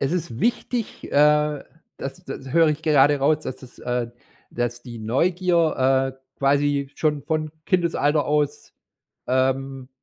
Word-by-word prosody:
es 140 +4 0
ist 160 -9 -3
wichtig, 240 -1 -1
äh, 150 0 +3 0.3
das 135 0 -7
das 135 0 -7
höre 165 -1 +5
ich 155 +1 -2
gerade 145 -2 +4
raus, 150 +3 +2
dass 130 - -6
das 130 -2 -15
äh, 125 -1 -2 0.4
dass 120 0 -3
die 120 -2 -9
Neugier, 135 - +2
äh, - - -30 0.2
quasi 140 0 +1
schon 150 -3 0
von 155 0 -2
Kindesalter 160 -5 +1
aus, 150 -1 -1 0.5
ähm, 130 0 0
145 Hz, 140 wpm, -23 LUFS, 130-155 Hz, 0.5 s, höre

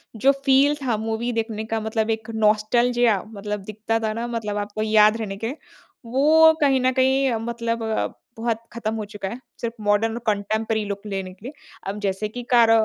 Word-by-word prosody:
जो 270 +6 +4
फ़ील 275 +2 +5
था 240 -4 +1
मूवी 225 +2 -2
देखने 220 -1 -5
का 225 - +1
मतलब 220 0 -1
एक 220 +1 -15
नॉस्टेल्जिया 220 0 +3
मतलब 205 -1 -5
दिखता 215 +2 -2
था 220 -1 -1
ना 230 +2 -3
मतलब 210 -2 -3
आपको 205 +1 -3
याद 215 0 +5
रहने 200 -3 -4
के 245 +5 -2 0.5
वो 310 +6 +5
कहीं 270 -2 +4
न 255 - +3
कहीं 265 0 +2 0.2
मतलब 230 0 -2 0.6
बहुत 230 -1 0 0.2
ख़त्म 225 -2 -3
हो 215 - -3
चुका 205 -1 -6
है 240 - -7 0.2
सिर्फ़ 230 -1 -2
मॉडर्न 215 +3 +2
कंटेम्पोरेरी 215 +1 0
लूक 200 0 -4
लेने 195 -2 -4
के 195 +5 -17
लिए। 280 - -6 0.3
अब 205 +2 -3
जैसे 195 +1 -1
कि 245 +2 -7
कार 230 -2 +6
220 Hz, 180 wpm, -23 LUFS, 210-240 Hz, 0.6 s, कार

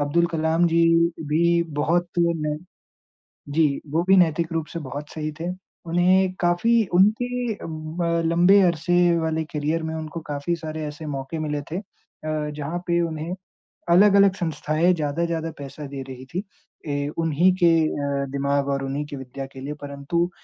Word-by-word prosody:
अब्दुल 145 +4 +2
कलाम 165 0 +1
जी 170 0 +3 0.5
भी 170 +2 +3 0.2
बहुत 175 +4 +1
नेे 160 -3 +1 1.0
जी, 150 -2 +2
वो 160 +3 +1
भी 190 - +7
नैतिक 170 -1 +2
रूप 165 -1 -1
से 170 - -4
बहुत 145 0 -6
सही 155 -1 -4
थे। 170 - -2 0.4
उन्हें 180 +2 +3
काफ़ी 220 +7 +3
उनके 240 +5 +2
अ, - - -15
ब 165 +1 -2
लंबे 175 +4 +5
अरसे 175 +1 +3
वाले 160 0 -1
करियर 155 +2 -1
में 160 0 -3
उनको 160 +1 -5
काफ़ी 145 +4 -1
सारे 155 -1 -6
ऐसे 150 +1 -7
मौक़े 140 +2 -4
मिले 150 -1 -2
थे 165 - -3
अ, 155 -6 -6
जहाँ 150 +4 -3
पे 170 -1 +2
उन्हें 160 +2 -4 0.6
अलग-अलग 200 +2 +6
संस्थाएँ 160 +1 +1
ज़्यादा-ज़्यादा 165 +1 -2
पैसा 145 +1 -8
दे 135 0 -6
रही 130 -1 -9
थीं। 185 - -1 0.5
ए 145 0 -1
उन्हीं 165 +2 +3
के - - +8 0.6
अ, - - -2
दिमाग़ 140 0 0
और 140 0 -1
उन्हीं 140 +2 -3
की 145 - -7
विद्या 135 0 -7
के 135 - -11
लिए, 140 +2 -4
परंतु 145 +5 -2
160 Hz, 160 wpm, -23 LUFS, 150-175 Hz, 1.0 s, के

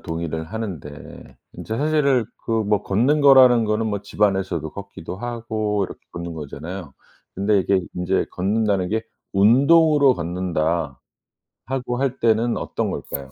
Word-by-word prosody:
동의를 80 -1 -4
하는데 80 -7 -8 0.2
인제 110 - -5
사실은 140 -4 +2 0.2
그 - - -6
뭐 105 0 0
걷는 125 +10 +2
거라는 130 -4 +7
거는 105 +1 0
뭐 105 -2 -2
집 105 - -5
안에서도 95 -6 0
걷기도 100 -3 -8
하고 110 -3 -2
이렇게 - - -9
걷는 85 0 -6
거잖아요. 80 +2 -7 0.4
근데 100 +2 +2
이게 95 +1 +2
인제 90 0 0
걷는다는 100 -1 0
게 110 +1 -1 0.3
"운동으로 140 +7 +5
걷는다." 85 - -2 0.7
하고 125 0 -3
할 135 -1 -1
때는 115 +1 +2
어떤 - - -3
걸까요? 70 -1 -6
105 Hz, 305 characters per minute, -22 LUFS, 85-120 Hz, 0.7 s, 거라는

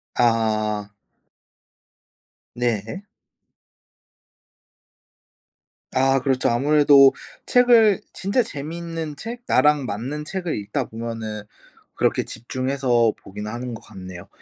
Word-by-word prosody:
아. 110 -3 +1 1.7
네. 120 - -2 2.9
아 135 +1 +3
그렇죠. 130 0 +1
아무래도 140 +2 +5 0.3
책을 235 -5 +5
진짜 200 +6 0
재미있는 160 0 -6
책 235 +9 -7
나랑 150 -2 +3
맞는 130 +8 -4
책을 180 -1 -3
읽다 115 +6 -3
보면은 110 -1 -6 0.5
그렇게 - - +1
집중해서 125 -1 0
보긴 105 +2 -8
하는 120 +3 -5
것 115 - -8
같네요. 95 -5 -10
130 Hz, 185 characters per minute, -22 LUFS, 110-150 Hz, 2.9 s, 아무래도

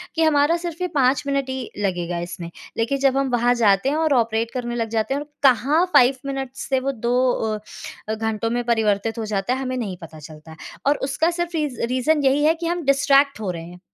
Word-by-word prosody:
कि 325 - +2
हमारा 310 +1 +3
सिर्फ़ 340 0 -5
ये - - +1
5 265 -1 +3
मिनट 275 -1 -1
ही 260 -1 -4
लगेगा 175 -3 -2
इसमें। 175 0 -6 0.3
लेकिन 235 +5 0
जब 270 -1 +2
हम 275 -1 +1
वहाँ 245 0 +3
जाते 200 +4 +4
हैं 290 - 0
और 315 -2 +2
ऑपरेट 230 -2 +1
करने 240 -2 -3
लग 230 -1 -2
जाते 220 +3 -1
हैं 285 - -2
और 295 - -9 0.2
कहाँ 280 +6 +4
5 255 +2 +6
मिनट्स 270 -1 -5
से 265 -1 +2
वो 270 +1 -1
2 240 -1 -2 1.0
अ, - - 0
घंटों 225 0 -2
में 240 +1 -1
परिवर्तित 225 -1 0
हो 225 - -2
जाता 210 +3 -1
है, 260 - -2
हमें 255 -1 -3
नहीं 200 -7 -4
पता 160 -1 -11
चलता 155 +1 -12
है। 160 - -12 0.3
और 290 - +3
उसका 320 +4 +1
सिर्फ़ 345 0 -3
रीज़ 295 -6 -2
रीज़न 285 +4 +1
यही 275 +2 +3
है 315 - +5
कि 335 0 -4
हम 345 -1 -2
डिस्ट्रैक्ट 275 -1 +3
हो 200 -4 -2
रहे 165 -2 -7
हैं, 175 +1 -12
255 Hz, 230 wpm, -22 LUFS, 220-280 Hz, 1.0 s, 5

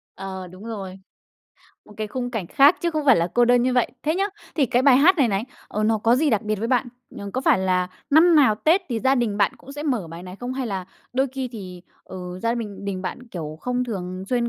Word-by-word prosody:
Ờ, 190 -1 -6
đúng 185 +4 -13
rồi. 195 -4 -6 0.9
Một - - -16
cái 215 -1 -3
khung 245 +3 -4
cảnh 215 -8 -3
khác 285 - +5
chứ 340 -1 0
không 310 -2 -2
phải 265 - +7
là 170 - +2
cô 240 0 +5
đơn 245 0 +4
như 255 0 +1
vậy. 245 -2 +2
Thế 310 +2 0
nhá, 390 - +1 0.3
thì 290 -5 +2
cái 245 +2 +2
bài 260 -2 +6
hát 350 +7 +5
này 260 -5 +4
này, 200 +2 -1 0.2
ờ, 210 - -2
nó 220 0 +2
có 230 +3 +3
gì 295 +1 +2
đặc 215 -1 +1
biệt 215 -1 -1
với 225 +3 -2
bạn? 250 0 +1 0.3
Ừm, 200 -1 -7
có 260 - -1
phải 270 - +3
là 185 -1 +1 0.2
năm 325 +3 +6
nào 265 -8 +5
Tết 325 - +2
thì 235 -3 -2
gia 265 +3 +3
đình 235 -5 0
bạn 200 -1 +2
cũng 275 - -13
sẽ 290 +1 -6
mở 245 - -1
bài 165 +2 -9
này 185 +1 -9
không? 245 +4 -5
Hay 260 -1 -3
là 195 -4 -3 0.3
đôi 265 +2 +2
khi 265 -1 -3
thì, 185 -5 -9 0.2
ờ, 190 - -9 0.3
gia 230 0 +1
bình 205 -4 -6
đình 190 -2 -3
bạn, 245 +6 -6
kiểu, 155 -7 -6
không 250 0 -1
thường 185 -5 -5
xuyên 240 -1 +1
230 Hz, 260 wpm, -23 LUFS, 195-260 Hz, 0.9 s, phải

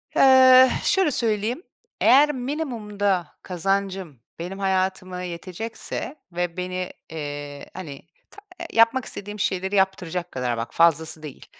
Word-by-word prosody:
Eh, 260 -1 +8
şöyle 380 -7 +3
söyleyeyim: 230 - -1 0.4
Eğer 280 +5 +6
minimumda 215 - -2
kazancım 190 -4 -2 0.2
benim 185 +3 -6
hayatıma 185 -1 -1
yetecekse 185 - -6 0.2
ve 175 0 -3
beni, 180 0 -3 0.2
eee, 145 -2 -6
hani, 155 -7 -9 0.2
ta 410 - -14 0.3
yapmak 230 +3 +4
istediğim 205 +1 -7
şeyleri 190 0 -1
yaptıracak 180 -2 0
kadar, 125 -2 -2
bak 115 +1 -5
fazlası 160 -1 +2
değil, 145 -3 -9
190 Hz, 115 wpm, -24 LUFS, 170-230 Hz, 0.4 s, Eh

